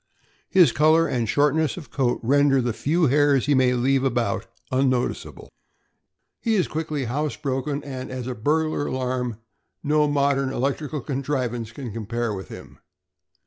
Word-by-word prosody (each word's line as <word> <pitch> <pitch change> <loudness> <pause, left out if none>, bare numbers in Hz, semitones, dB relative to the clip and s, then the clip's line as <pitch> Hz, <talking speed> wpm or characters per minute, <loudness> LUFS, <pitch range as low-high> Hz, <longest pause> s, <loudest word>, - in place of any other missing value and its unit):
His 175 -9 +5
color 155 +4 +4
and 115 -4 -1
shortness 150 +3 +2
of 150 -9 -10
coat 125 -3 0
render 140 +2 +4
the 120 -2 0
few 160 +8 +1
hairs 145 -1 +3
he 145 - +2
may 130 -2 +3
leave 130 +2 +2
about 120 -4 -1 0.2
unnoticeable. 130 -1 -1 0.9
He 225 -2 0
is 185 - +2
quickly 155 -3 -3
house 145 +5 -2
broken, 140 0 -3
and 130 -2 -6
as 130 -2 -5
a 130 - -3
burglar 150 +5 0
alarm 125 -3 -2 0.5
no 150 +1 +2
modern 140 -2 +1
electrical 140 +3 -2
contrivance 130 -4 -3
can 120 -3 -7
compare 115 +1 -3
with 95 -1 -6
him. - - -12
135 Hz, 145 wpm, -24 LUFS, 125-150 Hz, 0.9 s, His